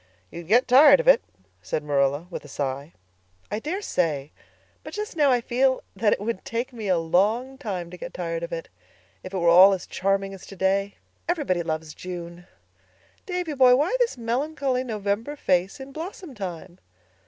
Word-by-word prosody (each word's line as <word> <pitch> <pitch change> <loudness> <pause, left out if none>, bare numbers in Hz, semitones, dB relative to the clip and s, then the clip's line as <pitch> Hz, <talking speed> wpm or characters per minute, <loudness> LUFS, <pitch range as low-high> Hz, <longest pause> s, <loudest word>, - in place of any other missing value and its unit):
"You'd 170 -1 -9
get 240 +6 +4
tired 280 - +8
of - - -2
it," - - +7 0.4
said 95 - -3
Marilla, 145 +1 +1
with - - -6
a - - -12
sigh. 140 +2 -4 0.6
"I 210 - -1
daresay; 180 - -2 0.5
but - - -8
just 420 -2 -5
now 295 -3 +4
I 250 -2 +3
feel 260 +2 +1
that 215 - +2
it - - +1
would 205 -1 -3
take 240 +3 -3
me 220 -3 -6
a 185 -2 +3
long 210 +11 +1
time 185 -9 -4
to 180 - -9
get - - -7
tired 165 -2 -4
of 170 - -5
it, 165 -1 -5 0.5
if 185 - -9
it 195 - -3
were 170 -2 +1
all 185 +3 +8
as 185 - -4
charming 195 +1 -1
as 190 - -11
today. 195 +1 0 0.3
Everything 270 - 0
loves 155 -1 -3
June. 175 -1 -8 0.8
Davy 360 -4 -2
boy, 255 -2 +6
why 300 - +1
this 475 - +1
melancholy 255 +2 -1
November 220 +3 -2
face 190 -1 0
in 265 +1 -9
blossom 330 +1 -7
time?" 185 -4 -7
200 Hz, 175 wpm, -25 LUFS, 175-265 Hz, 0.8 s, tired